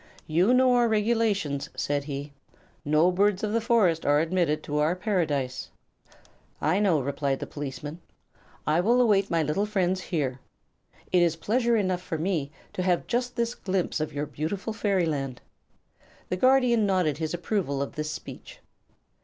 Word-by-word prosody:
"You 175 Hz, +8 st, +2 dB
know 255 Hz, 0 st, +5 dB
our 240 Hz, -1 st, +4 dB
regulations," 210 Hz, -9 st, 0 dB
said 145 Hz, -1 st, -1 dB
he; 140 Hz, 0 st, -6 dB, 0.5 s
"no 155 Hz, +4 st, +3 dB
birds 195 Hz, +1 st, +1 dB
of 210 Hz, 0 st, -1 dB
the 230 Hz, -, +2 dB
forest 215 Hz, -8 st, +2 dB
are 145 Hz, +1 st, +3 dB
admitted 160 Hz, -2 st, 0 dB
to 150 Hz, 0 st, -2 dB
our 155 Hz, +4 st, +2 dB
Paradise." 150 Hz, -, -1 dB, 0.9 s
"I 160 Hz, +6 st, +1 dB
know," 190 Hz, -7 st, +3 dB
replied 140 Hz, 0 st, -1 dB
the -, -, -4 dB
policeman. 145 Hz, +3 st, -7 dB, 0.6 s
"I 155 Hz, +2 st, +2 dB
will 235 Hz, +7 st, +3 dB
await 205 Hz, -5 st, +3 dB
my 165 Hz, -2 st, +1 dB
little 175 Hz, +8 st, 0 dB
friends 190 Hz, -3 st, 0 dB
here. 140 Hz, -8 st, -2 dB, 0.7 s
It 180 Hz, -, +4 dB
is 170 Hz, -2 st, +3 dB
pleasure 235 Hz, +7 st, +1 dB
enough 185 Hz, -3 st, 0 dB
for 170 Hz, -3 st, -4 dB
me 160 Hz, -4 st, -1 dB, 0.2 s
to -, -, -3 dB
have 180 Hz, -1 st, +1 dB
just 245 Hz, +1 st, -2 dB
this 235 Hz, 0 st, 0 dB
glimpse 185 Hz, -6 st, -2 dB
of 155 Hz, -, -2 dB
your 145 Hz, +1 st, -3 dB
beautiful 160 Hz, -, -4 dB
fairyland." 160 Hz, -, -1 dB, 0.9 s
The -, -, 0 dB
Guardian 245 Hz, -1 st, +4 dB
nodded 180 Hz, -7 st, +1 dB
his 160 Hz, +1 st, -2 dB
approval 175 Hz, -6 st, -2 dB
of 140 Hz, -, -3 dB
this 155 Hz, 0 st, -3 dB
speech. -, -, -9 dB
180 Hz, 160 wpm, -26 LUFS, 150-210 Hz, 0.9 s, know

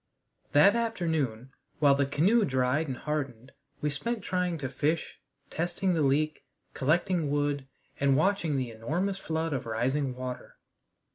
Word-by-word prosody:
That 150 Hz, +9 st, +7 dB
afternoon, 160 Hz, -, -1 dB, 0.3 s
while 145 Hz, -2 st, +5 dB
the 140 Hz, 0 st, +1 dB
canoe 190 Hz, +12 st, +3 dB
dried 130 Hz, 0 st, +1 dB
and 130 Hz, -2 st, -4 dB
hardened, 135 Hz, -5 st, -4 dB, 0.3 s
we 150 Hz, -, 0 dB
spent 220 Hz, +9 st, -3 dB
trying 180 Hz, -3 st, -1 dB
to 140 Hz, -3 st, -3 dB
fish, 150 Hz, +5 st, -1 dB, 0.3 s
testing 175 Hz, +3 st, 0 dB
the 165 Hz, -, +1 dB
leak, 150 Hz, +2 st, +1 dB, 0.3 s
collecting 165 Hz, +2 st, +1 dB
wood, 145 Hz, -1 st, 0 dB, 0.3 s
and 135 Hz, -1 st, +3 dB
watching 170 Hz, -4 st, +1 dB
the 125 Hz, -3 st, -2 dB
enormous 170 Hz, -, -2 dB
flood 160 Hz, -2 st, -2 dB
of 130 Hz, -, -3 dB
rising 130 Hz, +4 st, 0 dB
water. 125 Hz, 0 st, -6 dB
150 Hz, 140 wpm, -29 LUFS, 135-170 Hz, 0.3 s, That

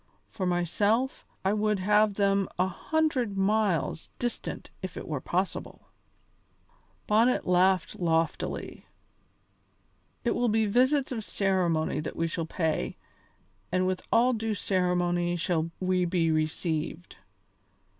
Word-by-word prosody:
For 185 Hz, -3 st, -2 dB
myself, 205 Hz, -, 0 dB, 0.2 s
I 195 Hz, -, +3 dB
would 210 Hz, 0 st, +1 dB
have 210 Hz, +2 st, +3 dB
them 195 Hz, -1 st, +2 dB
a 180 Hz, -, +3 dB
hundred 250 Hz, -, -1 dB
miles 195 Hz, -6 st, +1 dB
distant 240 Hz, -1 st, -4 dB
if 185 Hz, -2 st, -6 dB
it -, -, -6 dB
were 150 Hz, -4 st, -3 dB
possible." 185 Hz, +6 st, -3 dB, 1.2 s
Bonnet 225 Hz, +4 st, +3 dB
laughed 180 Hz, 0 st, +2 dB
loftily. 165 Hz, -2 st, -1 dB, 1.4 s
"It 240 Hz, -, +1 dB
will 245 Hz, -1 st, +1 dB
be 220 Hz, 0 st, +2 dB
visits 260 Hz, +6 st, +2 dB
of 225 Hz, -4 st, -3 dB
ceremony 185 Hz, -6 st, 0 dB
that 155 Hz, -, -5 dB
we 165 Hz, -, 0 dB
shall 165 Hz, 0 st, -3 dB
pay, 160 Hz, -3 st, -1 dB, 0.7 s
and 185 Hz, +1 st, +2 dB
with 185 Hz, 0 st, -1 dB
all 245 Hz, +2 st, +4 dB
due 220 Hz, -1 st, -1 dB
ceremony 175 Hz, -2 st, +1 dB
shall 165 Hz, -1 st, 0 dB
we 185 Hz, -1 st, +1 dB
be 170 Hz, -2 st, +1 dB
received. 155 Hz, +1 st, -2 dB
185 Hz, 120 wpm, -28 LUFS, 175-215 Hz, 1.4 s, all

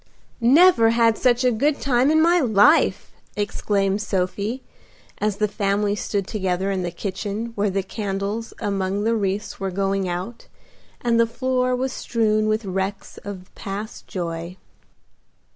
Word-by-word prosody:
"Never 255 Hz, 0 st, +6 dB
had 230 Hz, -1 st, +3 dB
such 245 Hz, +1 st, +2 dB
a 250 Hz, -, +4 dB
good 280 Hz, +6 st, +1 dB
time 260 Hz, 0 st, +2 dB
in 315 Hz, +1 st, +4 dB
my 345 Hz, +1 st, +4 dB
life!" 255 Hz, +4 st, +3 dB, 0.2 s
exclaimed 205 Hz, -1 st, 0 dB
Sophie, 200 Hz, +5 st, -2 dB, 0.6 s
as 210 Hz, -1 st, 0 dB
the 210 Hz, 0 st, +1 dB
family 200 Hz, 0 st, 0 dB
stood 200 Hz, -1 st, -2 dB
together 190 Hz, -2 st, -1 dB
in 190 Hz, -1 st, -1 dB
the 175 Hz, -, -2 dB
kitchen 200 Hz, +5 st, -4 dB
where 205 Hz, -1 st, 0 dB
the 195 Hz, 0 st, -1 dB
candles 200 Hz, +2 st, -4 dB
among 200 Hz, -1 st, -1 dB
the 230 Hz, +1 st, +2 dB
wreaths 200 Hz, 0 st, -2 dB
were 195 Hz, -1 st, -2 dB
going 195 Hz, 0 st, -1 dB
out, 185 Hz, +7 st, -5 dB, 0.5 s
and 235 Hz, -1 st, +2 dB
the 230 Hz, -, +4 dB
floor 255 Hz, +1 st, 0 dB
was 260 Hz, +1 st, -2 dB
strewn 215 Hz, -2 st, 0 dB
with 215 Hz, 0 st, 0 dB
wrecks 190 Hz, +1 st, -4 dB
of 190 Hz, -2 st, -9 dB
past 205 Hz, +3 st, -7 dB
joy. 170 Hz, 0 st, -5 dB
210 Hz, 145 wpm, -22 LUFS, 195-235 Hz, 0.6 s, Never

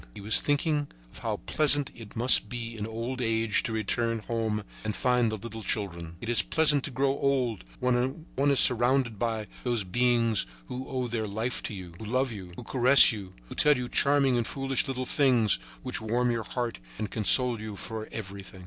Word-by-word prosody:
He -, -, -9 dB
was 105 Hz, +2 st, +5 dB
thinking 145 Hz, 0 st, 0 dB, 0.3 s
of -, -, -10 dB
how -, -, -3 dB
pleasant 145 Hz, -, +2 dB
it 115 Hz, -3 st, -12 dB
must 115 Hz, -3 st, +5 dB
be 115 Hz, -1 st, -6 dB
in 105 Hz, -1 st, -5 dB
old 115 Hz, +3 st, -5 dB
age 115 Hz, -2 st, +1 dB
to -, -, -3 dB
return 115 Hz, +2 st, -1 dB
home 110 Hz, -2 st, -2 dB, 0.2 s
and 110 Hz, -1 st, -3 dB
find 125 Hz, -3 st, +1 dB
the -, -, -3 dB
little 115 Hz, +2 st, -8 dB
children. 85 Hz, -6 st, -4 dB
It -, -, -7 dB
is 120 Hz, 0 st, +4 dB
pleasant 150 Hz, -3 st, +2 dB
to -, -, -4 dB
grow 135 Hz, +1 st, 0 dB
old 135 Hz, -, -1 dB, 0.2 s
when 125 Hz, +5 st, -1 dB
one 140 Hz, +2 st, +1 dB
is 140 Hz, -, +5 dB
surrounded 120 Hz, -2 st, +3 dB
by 110 Hz, -2 st, -2 dB, 0.2 s
those 120 Hz, -4 st, -1 dB
beings 115 Hz, -, +1 dB, 0.2 s
who 130 Hz, +1 st, -6 dB
owe 130 Hz, -2 st, -3 dB
their 115 Hz, -2 st, -3 dB
life 110 Hz, +4 st, -3 dB
to 105 Hz, -, -6 dB
you, 90 Hz, -3 st, -10 dB
who 110 Hz, -, -8 dB
love 130 Hz, +3 st, -1 dB
you, 95 Hz, -5 st, -9 dB
who -, -, -9 dB
caress 130 Hz, +1 st, +7 dB
you, 100 Hz, -5 st, -8 dB
who -, -, -9 dB
tell 150 Hz, -2 st, +3 dB
you 125 Hz, -1 st, -4 dB
charming 140 Hz, -1 st, +2 dB
and 120 Hz, -, -1 dB
foolish 135 Hz, 0 st, -2 dB
little 130 Hz, -1 st, -3 dB
things 125 Hz, -, +2 dB, 0.2 s
which -, -, -3 dB
warm 120 Hz, +3 st, 0 dB
your 115 Hz, -2 st, -3 dB
heart 120 Hz, -, -4 dB, 0.2 s
and 105 Hz, -, -5 dB
console 120 Hz, +1 st, +5 dB
you 110 Hz, -1 st, -7 dB
for 110 Hz, +2 st, -7 dB
everything. 100 Hz, -2 st, -8 dB
120 Hz, 200 wpm, -27 LUFS, 110-130 Hz, 0.3 s, caress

